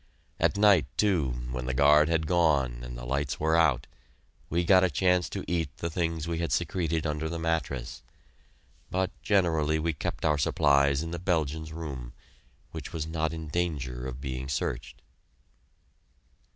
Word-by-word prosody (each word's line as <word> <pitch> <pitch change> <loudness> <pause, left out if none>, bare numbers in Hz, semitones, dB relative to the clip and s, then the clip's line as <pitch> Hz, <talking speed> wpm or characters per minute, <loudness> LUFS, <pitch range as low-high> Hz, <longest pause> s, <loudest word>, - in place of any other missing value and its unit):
At - - +2
night, 100 -7 +5
too, 90 -10 +2 0.2
when 65 0 -4
the 65 - -1
guard 75 +3 +5
had 80 -1 +1
gone 75 -8 +2
and - - -7
the - - -7
lights 70 +2 -2
were 80 +1 +2
out, 80 -7 +3 0.6
we 85 +2 +1
got 95 +1 +5
a 95 - +3
chance 90 +3 +2
to - - -5
eat 80 -6 -2
the 85 - -3
things 80 -1 -2
we 85 -1 -2
had 85 -4 -2
secreted 80 -1 0
under 75 +1 -2
the 85 - -3
mattress; 70 -7 -2 0.9
but 95 +1 0
generally 80 -6 +2
we 80 +1 -1
kept 70 - -4
our 75 -2 +2
supplies 70 0 +3
in 80 - -5
the 85 - -4
Belgians' 80 -3 -1
room, 70 -7 -6 0.6
which - - -7
was 80 -2 -3
not 80 -1 -1
in 80 -1 -6
danger 70 -7 -2
of 65 -1 -6
being 65 0 -5
searched. 65 -2 -3
80 Hz, 165 wpm, -28 LUFS, 70-85 Hz, 0.9 s, night